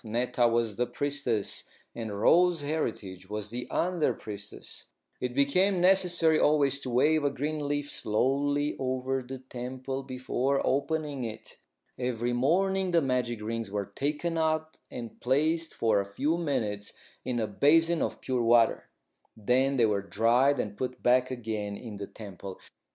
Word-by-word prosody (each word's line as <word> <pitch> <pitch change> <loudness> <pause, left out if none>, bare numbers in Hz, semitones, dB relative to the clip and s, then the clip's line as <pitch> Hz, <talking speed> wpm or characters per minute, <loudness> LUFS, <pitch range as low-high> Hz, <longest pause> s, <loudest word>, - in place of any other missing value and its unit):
Netta 120 +2 +1
was 115 -3 0
the 125 0 +1
priestess 135 -5 -1 0.3
and 110 -3 -5
Rose 175 +5 +4
Heritage 100 - -3
was 105 0 -5
the 125 +1 -4
under 175 -3 +1
priestess. 105 -1 -8 0.3
It 125 -1 -3
became 180 +8 +3
necessary 175 -3 +4
always 140 -2 +3
to 135 - -6
wave 145 +5 +3
a 145 - +3
green 145 +2 -3
leaf 145 0 -2
slowly 145 +6 0
over 130 0 -1
the 130 +1 -7
temple 130 +1 -5
before 130 +1 -1
opening 145 -1 -1
it. 115 -1 -8 0.4
Every 120 -1 -1
morning 190 +9 +2
the 170 -1 +3
magic 125 -4 -1
rings 115 -1 -3
were 100 -1 -4
taken 150 +4 -1
out 155 0 -1
and 115 -2 -8
placed 155 +6 +1
for 110 -3 +2
a - - -5
few 145 +10 0
minutes 110 -11 -2 0.3
in 125 -1 -2
a 110 - +1
basin 160 +10 +3
of - - -2
pure 130 -2 -1
water. 115 0 +3 0.5
Then 130 +5 +2
they 120 - +5
were 105 -2 +1
dried 120 +7 +2
and 105 -3 -3
put 125 +2 -5
back 125 +1 +4
again 110 -5 -4
in 110 -4 -8
the 100 0 -6
temple. 100 -3 -9
130 Hz, 150 wpm, -29 LUFS, 115-145 Hz, 0.5 s, they